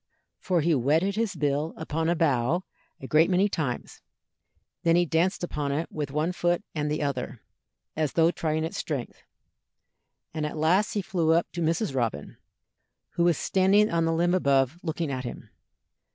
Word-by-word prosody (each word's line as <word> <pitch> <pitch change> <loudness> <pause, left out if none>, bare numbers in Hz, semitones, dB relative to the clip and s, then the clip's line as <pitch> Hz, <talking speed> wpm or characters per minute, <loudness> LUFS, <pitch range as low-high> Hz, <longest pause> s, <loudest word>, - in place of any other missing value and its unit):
For 180 -3 +1
he 165 +2 +2
whetted 155 +9 +2
his 220 -4 -1
bill 145 +1 -1
upon 160 +1 -2
a 170 - +2
bough 155 +1 +1 0.4
a - - -8
great 155 +5 +4
many 190 +2 +3
times, 155 -10 -4
and - - -50
then 165 0 +4
he 175 0 +4
danced 170 +4 0
upon 150 -5 -2
it 155 +4 -2
with 150 -3 -4
one 155 +5 0
foot 175 +1 0
and 150 -1 -2
the 150 0 -1
other, 130 -4 -4 0.5
as 155 -3 -1
though 165 0 +4
trying 155 -2 -1
its 160 - -4
strength, 140 -6 -4 1.1
and 155 -1 -3
at 150 +1 -3
last 180 +7 +2
he 205 - -1
flew 165 -4 +1
up 170 +1 +1
to 175 - -5
Mrs. 165 +2 0
Robin, 115 - -2 0.7
who 170 - +1
was 170 -4 +3
standing 195 +3 +3
on 165 -1 +1
the 165 - +1
limb 170 +2 +1
above 140 -3 +2
looking 160 -2 -3
at 130 -1 -3
him. 120 - -8
160 Hz, 180 wpm, -26 LUFS, 145-175 Hz, 1.1 s, great